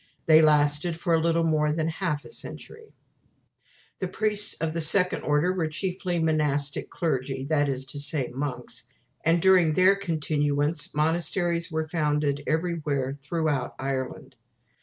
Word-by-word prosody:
They 160 0 +7
lasted 150 +2 +2
for 170 - 0
a 165 - +4
little 165 0 +2
more 155 -2 +2
than 160 +1 -1
half 160 -3 -3
a - - -10
century. 450 -1 -8 1.0
The 185 - -2
priests 210 +2 +1
of 160 -1 -2
this 165 -2 +3
Second 185 +1 +2
Order 150 +5 +1
were 175 -4 -1
chiefly 180 +2 -2
monastic 150 -3 0
clergy 135 -4 -2
that 145 0 +1
is 135 -1 -3
to 140 +2 -8
say, 145 -2 0
monks 125 -3 -5 0.4
and 165 +1 +3
during 180 -3 +4
their 185 +4 +5
continuance 150 -5 -1
monasteries 170 +2 0
were 160 0 -2
founded 150 -3 0
everywhere 155 -5 -1
through 155 +3 -3 0.3
Ireland. 130 -1 -4
155 Hz, 140 wpm, -26 LUFS, 145-170 Hz, 1.0 s, They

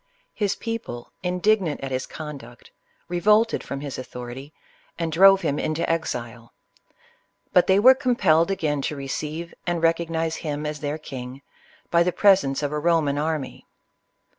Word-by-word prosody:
His 205 -3 -1
people, 225 - -6
indignant 180 -2 +1
at 135 -1 -5
his 130 0 -2
con 150 -3 -7
duct, 120 -3 -15 0.4
revolted 210 +6 +2
from 140 0 -6
his 140 -3 -5
authority 125 +2 -8 0.5
and 165 -1 -2
drove 195 +4 +6
him 150 -4 -1
into 155 +1 -1
exile; 125 -8 -3 1.0
but 180 - +5
they 190 - +5
were 250 +6 +8
compelled 240 - +2
again 155 -7 -1
to 150 - -3
receive 150 +4 -5
and 170 -1 -1
recognize 165 -1 0
him 150 -2 -4
as 150 0 -4
their 145 0 -3
king, 130 -2 -8 0.5
by 170 - +4
the 180 +1 +2
presence 180 -9 +3
of 145 - -1
a 150 - -2
Ro 165 +2 +3
man 145 -2 -1
army. 155 -3 -3
160 Hz, 155 wpm, -24 LUFS, 140-180 Hz, 1.0 s, were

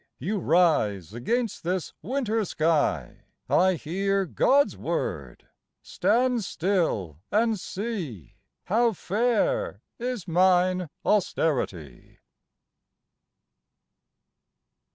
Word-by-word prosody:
You 195 - -2
rise 145 - +2
against 230 - -2
this 180 -1 -2
winter 225 - -1
sky, 160 -4 0 0.2
I 185 0 +3
hear 195 +5 -1
God's 280 - +3
word: - - -4 0.4
Stand 245 0 +1
still 160 - -1
and 220 0 +2
see 180 - -5 0.3
How 230 +3 +2
fair 245 - 0 0.2
is 245 -6 -4
mine 180 0 +3 0.2
austerity!" 125 - -1
185 Hz, 75 wpm, -26 LUFS, 160-225 Hz, 0.4 s, I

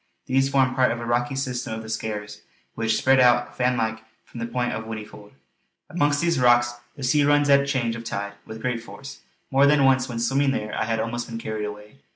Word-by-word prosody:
These 135 +1 +2
form 130 -2 +2
part 130 -1 +3
of 120 - -2
the 120 - -6
rocky 120 +2 0
system 125 -4 -3
of 110 - -7
the - - -10
Skares, 105 -1 -5 0.3
which 115 -1 0
spread 135 0 +4
out 120 -1 +3
fan 125 0 +1
like 110 -1 -2 0.2
from 120 - -11
the 115 - -3
point 125 0 -1
of 110 - -5
Whinnyfold. 105 -2 -9 0.6
Amongst 145 -4 +1
these 170 -4 +1
rocks 120 -1 +4 0.2
the 140 - -9
sea 145 +3 +3
runs 145 0 +3
at 140 0 +5
change 120 -5 -1
of 115 - -7
tide 100 -2 -4
with 110 0 -10
great 125 -2 -1
force; 135 +4 -11 0.3
more 135 +1 +5
than 140 -1 +4
once 130 -2 +3
when 120 - -5
swimming 135 +4 +1
there 105 -3 -4
I - - -1
had 115 0 0
been 110 0 -1
almost 120 0 -5
carried 110 -2 -4
away. 105 +5 -9
120 Hz, 220 wpm, -24 LUFS, 110-135 Hz, 0.6 s, at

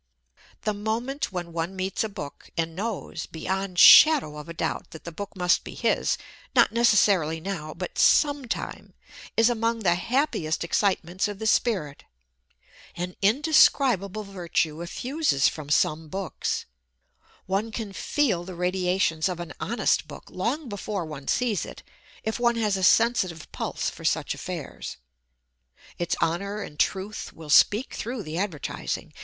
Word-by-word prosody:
The 215 - 0
moment 225 +7 -2
when 175 -2 -5
one 170 +3 -3
meets 190 +2 -1
a 220 - -3
book 165 -9 -9
and 165 -1 -1
knows, 200 -4 -4
beyond 190 +2 -3
shadow 275 - +8
of 165 +2 -9
doubt, - - -2
that 160 - -11
that 170 - -7
book 200 +5 -7
must 180 -2 +2
be - - -9
his - - +1 0.4
not - - +5
necessarily 200 -8 +3
now, 160 -4 -5
but 180 +2 -5
some 290 -2 +4
time - - -5 0.4
is 225 0 +6
among 230 -1 0
the 175 -4 +3
happiest 180 - 0
excitements 185 0 0
of 205 -1 -6
the 220 - -5
spirit. 190 - +1 0.9
An 180 +1 -4
indescribable 220 - +3
virtue 170 -5 -2
effuses 250 - +1
from 150 -2 -4
some 155 +1 +2
books. 190 +2 -3 0.8
One 200 +4 -1
can 215 -3 -5
feel 215 -5 0
the 185 0 -8
radiations 180 -2 +1
of 180 -2 -4
an 175 - -6
honest - - 0
book - - -11
long 255 +11 -2
before 205 -3 -4
one 150 -3 -9
sees 235 -7 +1
it, - - -10 0.4
if 220 +2 -2
one 240 -1 +3
has 215 -3 +1
a 190 - -3
sensitive 185 -5 +2
pulse - - -3
for - - -12
such - - 0
affairs. - - -6 1.0
Its 175 0 0
honour 200 +5 -1
and 150 -5 -11
truth 195 +2 -1
will 155 -2 -8
speak 215 - +5
through 235 -1 -4
the 155 +1 -4
advertising. 180 -8 -4
190 Hz, 150 wpm, -26 LUFS, 170-225 Hz, 1.0 s, shadow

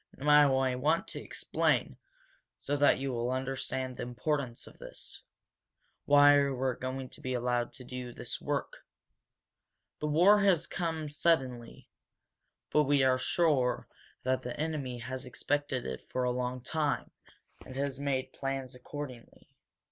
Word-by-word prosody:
"Now 145 -1 +5
I 130 -1 +1
want 155 +6 +1
to - - -5
explain, - - 0 0.6
so 145 - -2
that 145 0 +5
you 135 -1 -2
will 120 0 -1
understand 130 0 -2
the - - -5
importance 125 +1 -2
of - - -15
this, - - -9 0.8
why 145 0 +7
you 140 -2 0
are 130 -1 +1
going 130 +1 -4
to - - -14
be 130 0 -2
allowed 120 0 0
to 130 - -9
do 125 0 -6
this - - -6
work. - - -3 1.2
This 150 - -1
war 180 +7 +6
has 195 -5 +4
come 160 -3 -3
suddenly 135 -6 0 0.8
but 150 0 +4
we 140 -1 +4
are 130 -1 +4
sure 130 -5 +1 0.4
that 130 0 +1
the 125 +1 -6
enemy 150 -6 -2
has 130 +2 -6
expected 145 +1 -1
it 65 -1 -4
for 130 - -3
a 125 - +2
long 125 0 -2
time, 150 +3 -1 0.5
and 130 - -10
has 140 0 -2
made 135 -2 -1
plans 135 -2 -3
accordingly. 125 -1 -9
130 Hz, 150 wpm, -31 LUFS, 125-145 Hz, 1.2 s, why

